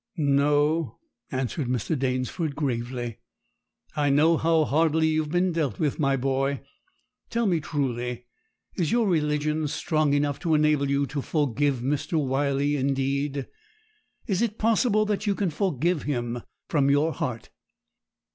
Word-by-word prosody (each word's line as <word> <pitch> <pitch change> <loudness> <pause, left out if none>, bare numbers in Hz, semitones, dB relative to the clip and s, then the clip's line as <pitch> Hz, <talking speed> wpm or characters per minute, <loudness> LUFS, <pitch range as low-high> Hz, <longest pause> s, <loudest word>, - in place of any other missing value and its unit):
'No,' 145 -1 +2 0.3
answered 130 +2 -2
Mr. 125 +5 -1
Danesford 135 +3 -2
gravely; 120 -4 -3 0.8
'I 145 -1 +1
know 155 +4 +4
how 160 -1 +2
hardly 160 +2 +2
you 155 0 +2
have 150 -1 -6
been 175 +1 +2
dealt 155 -10 -1
with, 150 -1 -1
my 135 -2 +2
boy. 135 +1 0 0.7
Tell 235 0 0
me 175 -5 +2
truly, 125 -5 -3 0.5
is 170 -5 -1
your 235 -2 +2
religion 150 -2 0
strong 150 0 0
enough 145 -1 0
to 165 -3 +1
enable 150 -2 +2
you 140 0 +2
to 140 +1 -4
forgive 145 -3 0
Mr. 140 +6 -2
Wyley 140 +1 0
indeed? 140 +1 -1 0.8
Is 195 -4 0
it 230 -2 -1
possible 215 -1 +2
that 210 0 -2
you 200 - +2
can 190 -4 -1
forgive 170 -1 0
him 120 -4 -2 0.3
from 140 -4 +2
your 145 +3 +3
heart?' 125 -9 -4
145 Hz, 140 wpm, -26 LUFS, 135-160 Hz, 0.8 s, know